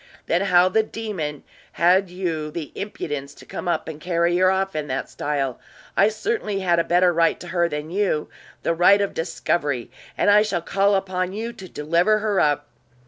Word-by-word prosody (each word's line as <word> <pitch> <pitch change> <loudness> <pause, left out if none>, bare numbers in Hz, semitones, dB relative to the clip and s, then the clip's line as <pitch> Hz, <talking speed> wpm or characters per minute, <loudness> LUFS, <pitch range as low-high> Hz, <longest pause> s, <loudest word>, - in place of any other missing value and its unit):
"Then 170 +2 +1
how 180 -2 +5
the 205 +4 +3
demon 200 -10 -5 0.3
had 180 +3 +3
you 170 -4 -3
the 155 -1 -6
impudence 145 -8 -5
to - - -14
come - - -6
up 175 - -1
and 155 -1 -7
carry 170 0 +1
her 185 0 +4
off 190 -1 0
in 150 -1 -2
that 135 0 -3
style? 140 -4 -2 0.4
I 200 - +5
certainly 220 - -2
had 175 -2 +2
a - - +3
better 175 +1 +3
right 165 0 +2
to 175 - -9
her 170 -1 +1
than 150 +1 -5
you 190 -6 0 0.4
the - - +1
right 180 +4 +5
of 200 -1 -1
discovery; 150 -6 -2 0.3
and - - +4
I 210 +1 +7
shall 195 -6 -1
call 200 +3 +2
upon 185 -1 -1
you 230 +3 -4
to 190 -5 -11
deliver 170 +9 +2
her 210 -2 0
up!" 145 -1 +2
175 Hz, 195 wpm, -23 LUFS, 160-195 Hz, 0.4 s, I